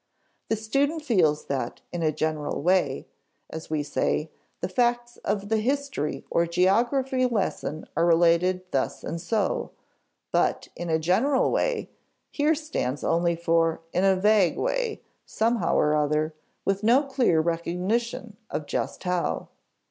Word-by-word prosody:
The 220 - +2
student 280 +9 0
feels 170 - +2
that 130 -4 -3
"in 175 - -3
a 155 -1 +2
general 155 -2 -2
way," 180 - +2 0.5
as 160 0 -7
we 155 -1 0
say, 150 +1 -1 0.3
the - - -2
facts 240 +4 0
of 200 -1 -3
the 220 0 +2
history 265 - -2
or 170 0 +2
geography 245 - +2
lesson 195 -8 -2
are 165 +2 +3
related 170 +2 +3
thus 135 - -1
and 165 +1 -4
so; 210 +4 -1 0.6
but - - +1
"in 175 - -5
a 160 - +3
general 220 - +2
way" - - -1 0.4
here 305 +2 +2
stands 290 - -3
only 170 0 +2
for 165 -1 +1
"in 180 - +1
a 195 -1 +5
vague 200 -2 +3
way," - - -1 0.2
somehow 230 +1 0
or 150 0 +3
other, 150 +1 +1 0.3
with 195 0 0
no 240 +6 +4
clear 260 - +2
recognition 180 +8 -1
of 150 - -3
just - - -3
how. 180 -2 -1
185 Hz, 140 wpm, -26 LUFS, 165-240 Hz, 0.6 s, a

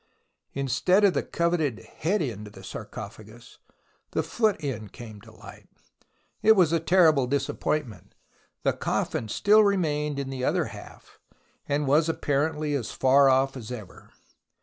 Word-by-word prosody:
Instead 140 - +2
of 200 -3 +5
the - - 0
coveted 170 -8 -1 0.2
head 190 +3 0
end 105 -6 -5
of 105 - -14
the - - -13
sarco - - -7
phagus, 110 +3 -14 0.5
the - - 0
foot 220 -4 +1
end 110 -8 -4
came 110 -4 -11
to 115 +1 -15
light. - - -14 0.7
It 220 - +7
was 175 -5 +3
a 165 - +3
terrible 160 -6 +4
disappointment. 140 - -3 0.5
The - - +2
coffin 110 - -2
still 210 - +4
remained 150 -7 0
in 135 -1 -4
the 130 -1 -5
other - - +1
half, - - -14 0.5
and 145 +1 0
was 155 +4 +3
apparently 150 0 -1
as 130 -6 -2
far 135 +1 +4
off 135 +1 +2
as 120 -2 -8
ever. 110 -7 -10
140 Hz, 150 wpm, -26 LUFS, 125-165 Hz, 0.7 s, It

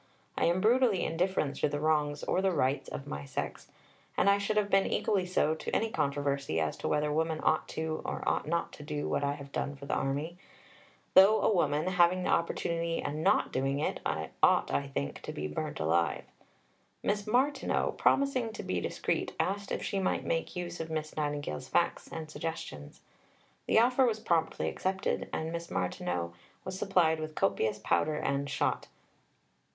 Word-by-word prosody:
I - - +1
am 175 +2 +2
brutally 230 -3 +4
indifferent 165 -4 0
to - - +1
the 145 0 -2
wrongs 150 -1 +1
or 185 - +1
the 190 0 +2
rights 140 -4 0
of 140 - -6
my 70 - -5
sex. 70 - -5 0.5
And 200 - +5
I 200 - +3
should 205 +1 -1
have 205 -1 +1
been 195 0 +4
equally 190 -3 +1
so 160 -4 +2
to 160 - -4
any 225 0 +1
controversy 140 - 0
as 80 -1 0
to - - -3
whether 150 0 +1
women 160 0 0
ought 155 - +1
or 160 0 -3
ought - - +1
not 170 +1 -1
to 150 - -10
do 150 0 -3
what - - 0
I 140 0 +1
have 140 -1 -10
done 140 - -2
for 140 0 -10
the - - -2
Army; 145 +6 -2 0.7
though 200 +3 +7
a - - +4
woman, 150 -4 +1
having 180 0 +3
the - - 0
opportunity 170 0 0
and 150 +2 -3
not - - +3
doing 135 +1 0
it, 150 - -1 0.4
ought, - - +4
I 140 - 0
think, 105 - -4
to - - -6
be 75 +1 -4
burnt 75 - -4
alive." 80 -2 +1 0.8
Miss 205 0 0
Martineau, 265 +5 +1
promising 260 -5 +2
to - - -6
be - - -1
discreet, - - -2
asked 200 +1 -1
if - - -2
she 195 - -1
might 190 - 0
make 165 - -1
use 175 -1 -4
of 165 0 -4
Miss 155 -1 -3
Nightingale's 145 - -3
facts - - +1
and 160 -1 -5
suggestions. 155 - -6 0.7
The - - +3
offer 250 +3 +5
was 220 -2 0
promptly 165 -6 0
accepted, 190 0 -1
and 160 +1 -2
Miss 170 0 -5
Martineau 90 -1 -2 0.3
was 185 0 -5
supplied 170 -5 +3
with 155 0 -5
copious 110 -1 +1
powder 155 +7 +1
and 140 -1 -1
shot. - - 0
160 Hz, 180 wpm, -31 LUFS, 140-190 Hz, 0.8 s, though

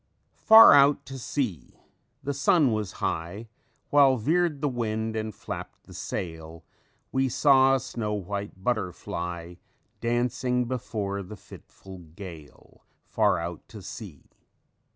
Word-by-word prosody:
"_Far 220 -7 +10
out 140 0 +5
at 135 - -6
sea 115 - -4 0.5
the 140 +1 -2
sun 140 0 +3
was 105 -4 -2
high, 95 +8 -4 0.4
While 140 -3 +5
veered 160 +5 +1
the 145 - 0
wind 110 -3 -2
and 110 0 -3
flapped - - -8
the - - -15
sail; 80 -1 -6 0.5
We 130 0 +1
saw 135 0 +5
a - - 0
snow 110 -2 -4
white 100 0 -6
butterfly 90 -5 -3 0.4
Dancing 125 +1 0
before 105 -5 -3
the 100 +3 -10
fitful 95 0 -13
gale 85 -2 -13 0.2
Far - - +2
out 85 0 -5
at 105 - -9
sea. 95 - -10
110 Hz, 125 wpm, -26 LUFS, 90-130 Hz, 0.5 s, Far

